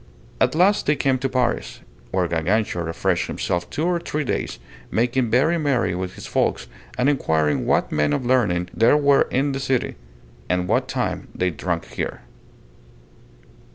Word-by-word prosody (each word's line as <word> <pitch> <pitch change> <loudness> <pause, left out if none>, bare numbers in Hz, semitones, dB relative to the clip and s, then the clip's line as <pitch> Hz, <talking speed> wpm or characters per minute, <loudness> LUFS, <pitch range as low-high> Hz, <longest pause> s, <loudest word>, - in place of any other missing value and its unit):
At - - +2
last 190 +5 +3
they 150 - +4
came 135 -2 +1
to 135 +1 -1
Paris, 120 - -1 0.3
where 90 -2 0
Gargantua 85 +2 0
refreshed 80 0 0
himself 85 0 -2
two 155 - -2
or 175 -1 +1
three 155 -3 -3
days, - - -2 0.3
making 120 +1 +1
very 155 +9 +3
merry 130 - +1
with 90 +1 -4
his - - -9
folks, - - 0 0.3
and 125 - +2
inquiring 80 - +1
what - - +2
men 75 -1 +1
of 120 - -1
learning 100 -9 +2
there 115 +6 +4
were 140 -1 +4
then - - +1
in 140 +1 +1
the 135 - -3
city, 135 -2 -1 0.5
and 90 0 0
what - - +1
wine - - -2
they 90 0 0
drunk 85 +2 -3
there. - - -3
120 Hz, 165 wpm, -22 LUFS, 90-140 Hz, 0.5 s, they